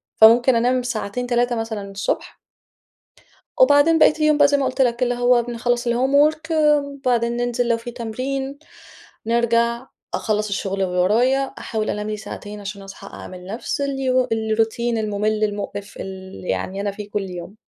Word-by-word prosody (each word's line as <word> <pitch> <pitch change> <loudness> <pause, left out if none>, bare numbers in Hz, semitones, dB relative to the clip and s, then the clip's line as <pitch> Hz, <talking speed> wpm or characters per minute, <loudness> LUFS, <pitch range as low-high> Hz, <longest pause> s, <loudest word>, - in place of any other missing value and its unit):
فممكن 235 +3 +6
أنام 250 +2 +2
ساعتين، 245 0 -3
3 240 0 +1
مثلًا 220 -3 -4
الصبح. 195 0 -3 1.2
وبعدين 290 +5 +6
بقية - - +7
اليوم 305 -1 +3
بقى 290 - +6
زي 285 0 +2
ما 275 - 0
قُلت 260 +1 -1
لك، 245 0 +2
اللي 245 0 0
هو 245 0 +3
بنخلّص 240 +1 -1
الhomework 290 +6 +2
وبعدين 280 -6 +1
ننزِل 245 0 0
لو 235 -1 +2
في 235 +1 -8
تمرين، 265 +4 -4 0.7
نرجع، 235 +1 +1 0.3
أخلَّص 215 -1 -1
الشغل 195 -1 -2
اللي 180 -1 -1
ورايا، 235 +9 +3 0.2
أحاول 215 -1 -3
أنام 210 +1 -3
لي 215 - -3
ساعتين 210 0 -8
عشان 200 0 -7
أصحى 195 0 -11
أعمل 180 -1 -9
نفس 225 +7 -4
الي 260 -2 +1
الروتين 225 +1 0
الممل، 215 0 -1
المقرف، 205 -1 -4
ال 190 0 -8
يعني 195 +2 -2
أنا 205 - -1
فيه 205 +1 -9
كل 200 -2 -3
يوم. 180 +2 -8
235 Hz, 155 wpm, -21 LUFS, 210-255 Hz, 1.2 s, بقية